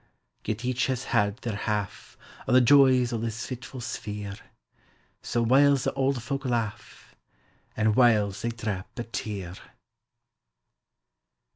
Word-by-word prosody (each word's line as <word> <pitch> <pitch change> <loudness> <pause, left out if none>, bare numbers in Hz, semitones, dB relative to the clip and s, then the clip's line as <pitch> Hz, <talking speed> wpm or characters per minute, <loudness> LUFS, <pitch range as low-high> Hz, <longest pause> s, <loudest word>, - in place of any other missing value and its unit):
Yet 110 +3 -3
each 125 0 0
has 130 -1 -2
had 105 -2 +1
their 115 -3 -2
half 105 -2 -4 0.3
O' - - 0
the 130 - +7
joys 130 -1 +5
o' 115 - -1
this 115 0 -4
fitful 125 0 -7
sphere, 105 -3 -5 0.9
So, 120 0 -1
whiles 140 +2 +4
the - - -1
auld 135 -2 0
folk 135 +2 -3
laugh, 115 -4 -4 0.6
An' 110 0 +2
whiles 105 -5 +3
they 115 - -1
drap 105 -2 -5
a 120 - -2
tear! 100 -6 -5
115 Hz, 130 wpm, -27 LUFS, 105-130 Hz, 0.9 s, the